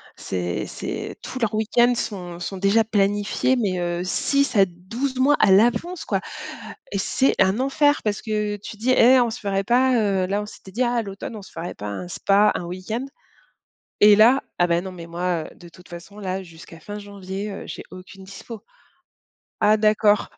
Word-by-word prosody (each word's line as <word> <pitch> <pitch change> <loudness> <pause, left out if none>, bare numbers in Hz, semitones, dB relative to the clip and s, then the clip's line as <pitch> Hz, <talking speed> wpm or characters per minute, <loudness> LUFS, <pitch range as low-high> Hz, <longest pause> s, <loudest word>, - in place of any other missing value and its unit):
c'est 90 -2 -3
c'est - - -6
tous 260 - -7
leurs 225 -2 0
week-end 240 +3 +3
sont 180 -7 -5
sont 195 +2 -5
déjà 200 +4 +3
planifiés, 205 +4 +1
mais 200 -7 0
heu, 175 0 -2
6 280 +8 0
à 195 -1 +6
12 230 +10 -5
mois 285 +3 +5
à 195 - +5
l'avance, 240 - +2
quoi, - - -1 0.7
et 200 - -2
c'est 260 +7 +1
un 190 +5 +3
enfer, 290 +2 +2
parce 210 -1 -2
que 210 -2 -2
tu 205 +1 -10
dis: 245 +4 0
«Hé, 255 +1 +6
on 240 - +2
se 245 - -7
ferait 195 -2 -1
pas, 255 +4 +3
heu» 195 -3 +1
là, 200 +2 -1
on 210 - -5
s'était 190 -2 -13
dit: 245 +5 0
«Ah, 245 0 +1
à 235 - +1
l'automne, 200 +2 -7
on 205 - -8
se - - -15
ferait 170 +1 -6
pas 105 - -8
un 175 - -5
spa, 200 +4 +3
un - - -3
week-end?» 185 +8 -4 1.0
et 210 0 +8
là: 240 +5 +6 0.2
«Ah, 175 - +4
mais 170 0 +1
non, 190 0 -7
mais 170 -2 -10
moi, 175 -1 -2
heu, - - -13
de 175 -1 -14
toute 180 +1 -17
façon, 175 +4 -11
là, 190 -1 -3
jusqu'à 165 -1 -14
fin 205 +3 -7
janvier, 200 0 -6
heu, 195 - -7
j'ai - - -7
aucune 190 +1 -12
dispo». 205 +3 -10 1.0
Ah, 215 +1 +5
d'accord! 210 -1 +3
205 Hz, 200 wpm, -23 LUFS, 185-230 Hz, 1.0 s, et